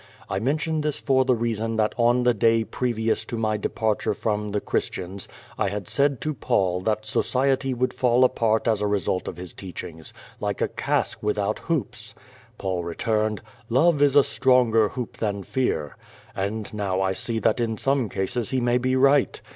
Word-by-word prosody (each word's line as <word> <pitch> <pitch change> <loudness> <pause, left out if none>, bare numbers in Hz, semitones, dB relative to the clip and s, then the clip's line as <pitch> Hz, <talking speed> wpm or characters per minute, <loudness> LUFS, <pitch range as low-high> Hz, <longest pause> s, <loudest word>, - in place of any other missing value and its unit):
I 95 - 0
mention 155 +6 0
this 150 -1 -1
for 130 -2 +2
the 130 -1 +3
reason 115 -1 -2
that 110 -1 +1
on 120 +1 +3
the 125 0 +4
day 115 +1 +3
previous 115 -1 -1
to 120 - -5
my 110 -1 0
departure 105 0 -1
from 105 -1 -2
the 105 - 0
Christians 95 -1 -3 0.3
I 100 - +1
had 100 -2 -5
said 140 -2 +1
to 155 - -1
Paul 95 -7 0
that 110 +2 -1
society 130 +4 +1
would 125 +1 0
fall 125 0 +3
apart 115 -3 +2
as 110 -3 +2
a 105 - +1
result 95 -2 -1
of 85 - -5
his 90 -1 -7
teachings, 85 -4 -8 0.3
like - - -2
a - - +1
cask - - -1
without 105 0 -1
hoops. 120 -9 -3 0.4
Paul 95 -2 -2
returned: 105 +5 -1 0.3
*'Love 145 +5 +3
is 145 -1 +4
a 145 - +8
stronger 120 -6 +3
hoop 125 -2 -6
than 100 -3 -2
fear/' 80 - -1 0.4
And 105 +4 -3
now 100 -3 -1
I 95 0 +1
see 115 +4 -2
that 110 - +1
in 115 -2 -1
some 135 -3 0
cases 100 +4 -2
he 130 - 0
may 120 0 +2
be 130 +1 +1
right. 135 +1 +3
115 Hz, 180 wpm, -24 LUFS, 105-130 Hz, 0.4 s, a